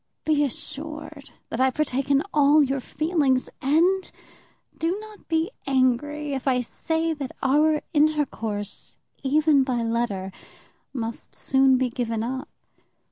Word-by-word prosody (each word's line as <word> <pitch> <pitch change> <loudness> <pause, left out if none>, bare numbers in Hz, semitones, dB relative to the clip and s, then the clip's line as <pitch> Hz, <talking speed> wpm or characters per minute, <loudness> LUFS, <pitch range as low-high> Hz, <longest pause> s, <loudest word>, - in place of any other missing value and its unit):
Be 300 -2 +3
assured 300 +2 -6 0.2
that 230 - -4
I 260 0 +5
partake 275 -1 -1
in 280 +1 +4
all 295 +1 +5
your 275 0 0
feelings, 285 -2 0
and 345 +7 +2 0.6
do 345 +5 -1
not 430 -1 -13
be 325 +4 0 0.2
angry 275 +3 +1
if 270 0 -4
I 250 -2 +3
say 320 +6 -1
that 280 -4 -6
our 300 +3 +3
intercourse, 275 - -1 0.2
even 290 0 +4
by 250 -3 -1
letter, 225 -5 -1 0.6
must 230 -3 -5
soon 265 -1 +3
be 255 -1 0
given 230 -3 -2
up. 260 +5 -4
275 Hz, 130 wpm, -25 LUFS, 255-310 Hz, 0.6 s, I